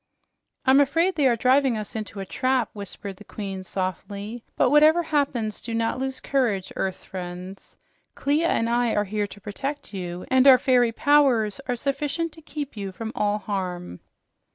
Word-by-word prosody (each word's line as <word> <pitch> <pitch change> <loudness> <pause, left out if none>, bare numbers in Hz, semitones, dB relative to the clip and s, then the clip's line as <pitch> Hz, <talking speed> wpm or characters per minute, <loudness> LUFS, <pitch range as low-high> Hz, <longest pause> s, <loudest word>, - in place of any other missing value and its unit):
"I'm 265 +1 +6
afraid 330 +7 +3
they 290 -5 +3
are 240 - +3
driving 255 +1 +3
us 215 +1 -6
into 215 -2 -5
a 195 - -4
trap," 255 +7 0
whispered 200 -1 -7
the 210 - -12
Queen 195 -2 -6
softly. 200 +5 -4
"But 250 - +3
whatever 310 +3 +6
happens, 275 -9 -1
do 230 -1 -4
not 230 +2 0
lose 265 0 -2
courage, 230 -9 0
earth 190 -1 -3
friends. 180 +1 -8 0.4
Clia 300 +4 +1
and 230 -8 +1
I 235 0 +1
are 205 - +2
here 205 +1 -2
to 200 - -12
protect 270 +8 -5
you, 180 -2 -5
and 260 +1 +5
our 260 -2 +10
fairy 245 -3 +3
powers 260 -4 +3
are 250 - 0
sufficient 285 +6 -2
to 320 - -11
keep 295 -3 -6
you 200 -2 -5
from 220 +3 -6
all 205 0 +1
harm." 185 - -4
230 Hz, 175 wpm, -25 LUFS, 200-275 Hz, 0.4 s, our